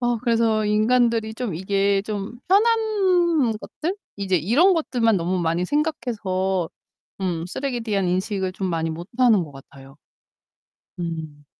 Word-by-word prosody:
아 240 -1 +1
그래서 230 -3 +2
인간들이 220 +1 +2
좀 230 -8 -3
이게 195 +2 +1
좀 210 +2 -5
편한 450 +4 +4 0.8
것들, 350 +5 -4 0.2
이제 195 -2 0
이런 255 - +4
것들만 240 - +1
너무 180 +1 -1
많이 170 +2 0
생각해서 195 - -1 0.5
음 175 -3 -2
쓰레기에 250 +6 -3
대한 205 -5 -1
인식을 185 +1 -1
좀 190 0 -3
많이 165 -1 -1
못 170 +2 -7
하는 230 -7 +5
것 150 - -13
같아요. 135 0 -14 1.0
음. 160 -4 -5
200 Hz, 270 characters per minute, -23 LUFS, 175-240 Hz, 1.0 s, 하는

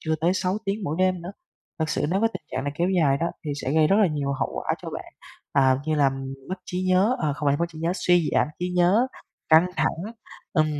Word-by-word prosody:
chưa 160 0 -1
tới 175 +3 +2
6 185 +2 0
tiếng 200 0 -2
mỗi 155 +1 -2
đêm 185 -2 +1
nữa. 180 +3 -7 0.5
Thực 160 -1 -1
sự 145 - 0
nếu 195 +2 +1
với 225 - +3
tình 185 - -7
trạng 130 +1 -2
này 145 - -2
kéo 175 +3 +1
dài 160 -8 +3
đó 165 +4 -1 0.2
thì 150 - -3
sẽ 135 - -1
gây 155 -1 +4
rất 195 - +3
là 210 -3 +5
nhiều 145 -3 -1
hậu 135 - -2
quả - - -1
cho - - -6
bạn, - - -8 0.4
à, 130 -1 +4
như 155 - +1
là 145 -2 +4 0.4
mất 185 - -3
trí 180 +1 -3
nhớ, 195 +7 +3
ờ, 150 -3 0
không 150 - -3
phải 140 - +3
mất 170 - 0
trí 160 -2 -12
nhớ, 165 +2 0
suy 175 -3 +2
giảm - - +3
trí 180 +1 -2
nhớ, 190 +8 +4 0.4
căng 160 +2 +6
thẳng - - 0 0.5
ừm, 155 -5 +3
170 Hz, 255 wpm, -25 LUFS, 150-185 Hz, 0.5 s, căng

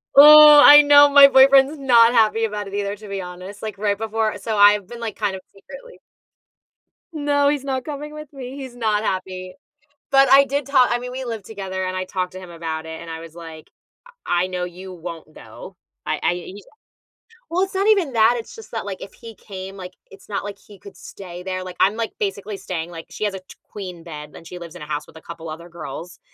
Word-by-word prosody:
Oh, 300 +1 +10
I 295 0 +10
know 290 0 +7
my 280 0 +9
boyfriend's 270 +2 +5
not 240 -4 +4
happy 225 -1 +3
about 210 -2 -5
it 195 - -11
either, 200 0 -3
to 210 +1 -13
be 195 -1 -5
honest, 185 +3 -10
like 215 -2 -6
right 205 0 -1
before 220 0 -2
So 215 +2 -3
I've 205 -1 +5
been, 240 +2 -10
like, 230 -2 -5
kind 205 -3 -2
of 190 - -9
secretly - - -14 1.1
No, 290 -2 +1
he's 290 -2 -2
not 260 -2 -3
coming 300 0 -7
with 305 -1 -10
me. 265 0 -9
He's 260 -3 -9
not 215 -3 -1
happy. 185 -2 -4 0.6
But 270 -1 +5
I 275 +1 +7
did 280 +1 -3
talk 260 -2 +3
I 240 - 0
mean, 250 0 -7
we 260 +1 -6
lived 225 -5 -6
together 190 -3 -6
and 185 0 -4
I 185 0 -3
talked 185 -1 -4
to 185 - -8
him 185 -1 -12
about 165 -2 -6
it 160 0 -8
and 170 - -10
I 160 0 -6
was 165 0 -12
like, 165 -2 -11 0.6
"I 175 +1 +1
I - - -2
know 180 -1 -4
you 185 +2 -9
won't 165 -3 -10
go. - - -13 0.3
I - - -2
I" - - +1
He's 185 +3 -10 0.9
Well, 360 +3 0
it's 390 0 -5
not 390 +2 0
even 385 -11 +2
that, 225 +1 +4
it's 230 - -9
just 450 - -13
that 225 - -5
like, 195 -2 -7
if 195 - -10
he 230 -2 -12
came, 195 -1 -10
like, 185 -1 -9 0.2
it's 195 0 -16
not 200 - -3
like 200 0 -7
he 205 - -17
could 200 - -14
stay 180 -2 -11
there, 185 0 -4
like, 185 -1 -10
I'm, 195 +3 +3
like, 230 -1 -3
basically 200 0 -4
staying, 170 -3 -5
like, 165 -1 -9
she - - -7
has 205 - -2
a - - -6
t 185 - -16 0.2
queen 180 -5 -8
bed 150 -3 -9
and - - -13
she 180 +1 -9
lives 170 -1 -11
in 175 - -11
a - - -7
house 150 0 -4
with - - -19
a - - -13
couple 165 -1 -10
other 170 +2 -9
girls, 170 0 -9
205 Hz, 235 wpm, -21 LUFS, 180-260 Hz, 1.1 s, Oh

